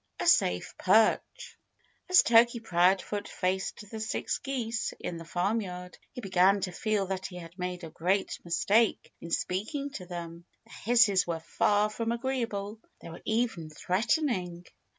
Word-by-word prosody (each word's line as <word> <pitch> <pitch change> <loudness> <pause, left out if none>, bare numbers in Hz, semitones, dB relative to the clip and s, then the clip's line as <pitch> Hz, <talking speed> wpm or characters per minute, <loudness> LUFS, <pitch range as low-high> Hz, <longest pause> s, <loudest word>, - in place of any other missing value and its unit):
V - - -3
A - - 0
SAFE 90 0 +3
PERCH 220 - +2 0.5
As 365 - +7
Turkey 235 +1 +5
Proudfoot 195 0 +1
faced 190 +2 -2
the 220 - -6
six 220 - -2
geese 240 -5 -3
in 170 - -5
the 165 - -9
farmyard 180 0 -3
he 250 - -7
began 195 0 +3
to 185 - -2
feel 210 +2 -1
that 190 0 -4
he 180 - -12
had 170 -1 -10
made 180 0 -4
a 165 - -7
great 190 +4 -1
mistake 205 +6 +1
in 170 - -8
speaking 220 - -2
to 185 -10 -8
them. 170 -1 -7 0.2
Their - - -14 0.2
hisses 205 -7 +5
were 165 -1 -2
far 205 +5 +1
from 230 +1 -2
agreeable. 230 -4 -3 0.2
They - - -10
were 165 - -10
even 220 -8 -1
threatening. 185 - -1
195 Hz, 155 wpm, -29 LUFS, 180-225 Hz, 0.5 s, As